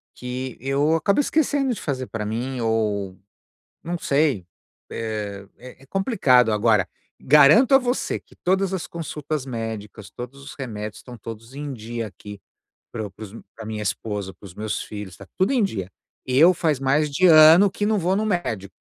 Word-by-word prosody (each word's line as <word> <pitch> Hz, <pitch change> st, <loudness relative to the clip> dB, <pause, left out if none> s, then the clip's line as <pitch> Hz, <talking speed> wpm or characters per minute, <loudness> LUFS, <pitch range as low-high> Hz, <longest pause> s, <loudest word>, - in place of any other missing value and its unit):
Que 125 Hz, 0 st, -6 dB
eu 140 Hz, +5 st, +1 dB
acabo 180 Hz, -, +2 dB
esquecendo 285 Hz, -2 st, +1 dB
de 215 Hz, -, -7 dB
fazer 130 Hz, -4 st, -3 dB
para 110 Hz, -2 st, -4 dB
mim 125 Hz, +5 st, -3 dB
ou, 105 Hz, -4 st, -1 dB, 0.7 s
não 175 Hz, +1 st, -3 dB
sei, 140 Hz, -, +1 dB, 0.4 s
é 105 Hz, -3 st, -5 dB
é 125 Hz, +1 st, -13 dB
é -, -, -17 dB
complicado, 140 Hz, -, +3 dB
agora, 105 Hz, -3 st, +2 dB, 0.3 s
garanto 150 Hz, -, +6 dB
a -, -, +9 dB
você 250 Hz, -1 st, -1 dB
que -, -, -22 dB
todas 190 Hz, +1 st, 0 dB
as 185 Hz, -, -3 dB
consultas 155 Hz, -3 st, -5 dB
médicas, 110 Hz, -4 st, -6 dB
todos 125 Hz, +5 st, -9 dB
os 140 Hz, -, -10 dB
remédios 105 Hz, -5 st, -6 dB
estão 125 Hz, -1 st, -11 dB
todos 115 Hz, +3 st, -10 dB
em 145 Hz, 0 st, -5 dB
dia 115 Hz, -1 st, -5 dB
aqui 105 Hz, 0 st, -11 dB, 0.5 s
para 110 Hz, -3 st, -4 dB
para 100 Hz, +3 st, -14 dB
os 100 Hz, -, -11 dB, 0.2 s
para 110 Hz, -, -8 dB
minha 110 Hz, -1 st, -4 dB
esposa, 100 Hz, -2 st, -3 dB
para -, -, -20 dB
os 90 Hz, -, -12 dB
meus 105 Hz, +1 st, -3 dB
filhos, 105 Hz, -3 st, -8 dB
está 100 Hz, -, -13 dB
tudo 190 Hz, +7 st, +2 dB
em 255 Hz, -4 st, +2 dB
dia. 100 Hz, -, -2 dB, 0.4 s
Eu 145 Hz, +8 st, +6 dB
faz 155 Hz, -6 st, 0 dB
mais 145 Hz, +3 st, +2 dB
de 180 Hz, +6 st, +3 dB
ano 165 Hz, +4 st, +8 dB
que 205 Hz, -, -2 dB
não 215 Hz, 0 st, +2 dB
vou 185 Hz, +1 st, +1 dB
no 215 Hz, +1 st, 0 dB
médico. 115 Hz, -, -2 dB
130 Hz, 180 wpm, -23 LUFS, 110-165 Hz, 0.7 s, a